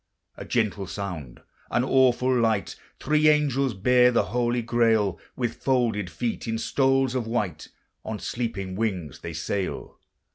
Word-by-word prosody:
A - - -8
gentle 105 -5 -1
sound, 85 -11 -6 0.3
an 120 - +1
awful 130 -1 +3
light! 110 -4 +1 0.2
Three 155 0 +2
angels 140 -5 +2
bear 125 +5 +4
the 120 - +3
holy 120 0 0
Grail: 110 -6 +2 0.2
With 120 -3 -3
folded 120 -8 +1
feet, 110 +11 -3
in 115 0 -1
stoles 135 +2 +1
of 125 -3 -2
white, 100 -9 -2 0.4
On 110 0 -4
sleeping 100 -6 -4
wings 95 - -3
they 85 - -7
sail. 95 +4 -4
115 Hz, 140 wpm, -25 LUFS, 100-125 Hz, 0.4 s, bear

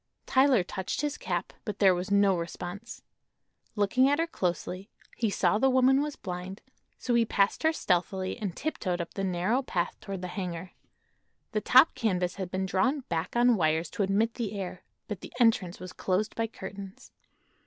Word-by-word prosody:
Tyler 260 -6 +4
touched 190 +6 -3
his 295 -1 -1
cap, - - -3
but 210 -5 -4
there 195 -3 +5
was 180 +2 -3
no 200 -1 +4
response. 175 +5 -6 0.7
Looking 220 +6 +3
at 285 - +3
her 330 - +2
closely 185 - -3 0.3
he 230 -2 0
saw 210 +1 +2
the 265 - +4
woman 260 +1 +4
was 295 0 -3
blind, 185 +1 -6 0.4
so 245 - -2
he 235 -1 +5
passed 200 -2 +1
her 320 - +4
stealthily 185 - 0
and 195 -6 -3
tiptoed 190 - -2
up 170 - -5
the 195 - -3
narrow 190 +7 +1
path 180 -9 -2
toward 195 -2 -6
the - - -2
hangar. 180 -2 -5 0.8
The 215 -2 0
top 260 +8 +6
canvas 180 -5 0
had 190 -2 -4
been 190 +1 -2
drawn 255 +10 +1
back 165 +4 -2
on 240 0 +5
wires 160 -2 +1
to - - -3
admit 205 +4 +2
the 215 -4 -4
air, 185 -1 -5 0.3
but 205 -4 -5
the - - -10
entrance 220 -7 +3
was 185 0 -8
closed 195 +3 -1
by 225 0 0
curtains. 195 -2 -9
195 Hz, 180 wpm, -29 LUFS, 180-235 Hz, 0.8 s, top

